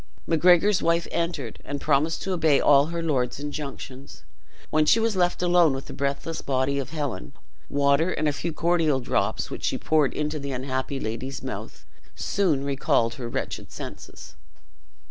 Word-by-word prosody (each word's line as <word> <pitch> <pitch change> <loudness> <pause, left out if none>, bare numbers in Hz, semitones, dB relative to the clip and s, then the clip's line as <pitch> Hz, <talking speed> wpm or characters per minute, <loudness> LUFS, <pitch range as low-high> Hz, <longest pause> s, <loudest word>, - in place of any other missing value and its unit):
Macgregor's 180 +4 +4
wife 170 0 +1
entered, 165 -9 -3
and 145 0 -4
promised 150 +3 +1
to 190 - -1
obey 160 -5 +3
all 140 0 +5
her 170 0 -3
lord's 130 -6 0
injunctions. 140 -2 -7 0.5
When 155 0 +4
she 230 - +6
was 225 -2 +1
left 180 -1 +1
alone 175 -4 +4
with 135 - -6
the - - -9
breathless 140 +4 -2
body 135 +1 0
of 135 -1 -4
Helen, 140 - -4 0.4
water, 140 +4 +3
and 155 -3 0
a 145 - +1
few 165 +4 -3
cordial 160 -3 +2
drops, 125 - -1
which - - -6
she - - 0
poured 155 -3 +1
into 150 0 -2
the 140 -1 -4
unhappy 130 +1 -3
lady's 125 +5 -5
mouth, - - -7 0.3
soon 170 -9 0
recalled 135 -4 +1
her 120 - -4
wretched - - -4
senses. - - -9
145 Hz, 165 wpm, -25 LUFS, 135-165 Hz, 0.5 s, she